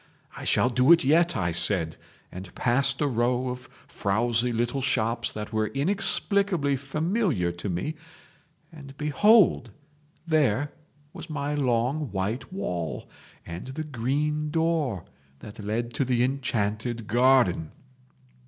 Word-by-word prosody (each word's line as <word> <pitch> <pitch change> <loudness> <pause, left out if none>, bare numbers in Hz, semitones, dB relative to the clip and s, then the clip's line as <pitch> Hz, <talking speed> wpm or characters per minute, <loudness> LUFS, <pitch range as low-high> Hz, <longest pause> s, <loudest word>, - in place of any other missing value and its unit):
'I - - -8
shall 125 - +3
do 125 +5 +4
it 170 - +7
yet,' 165 +5 +3
I 85 -2 0
said, 85 -1 -1 0.4
and 90 0 -10
passed 135 +4 +1
a 145 - +2
row 125 0 0
of 125 0 -7 0.2
frowsy 120 +4 0
little 120 +3 -1
shops 115 -2 0
that 105 +1 -7
were 110 0 +1
inexplicably 185 - +1
familiar 150 - -1
to 85 +4 -6
me, 90 - -2 0.8
and 140 -4 -12
behold! 165 - +4 0.6
there 145 -4 +1 0.4
was 165 - -9
my 145 -1 -3
long 130 +1 0
white 100 - -3
wall 90 - -4 0.4
and 85 +7 -7
the 140 +4 -5
green 150 +3 -1
door 155 - 0 0.3
that 105 +8 -12
led 115 +3 -2
to - - 0
the 125 -2 +1
enchanted 120 -3 -2
garden! 120 -8 +3
125 Hz, 125 wpm, -26 LUFS, 110-150 Hz, 0.8 s, it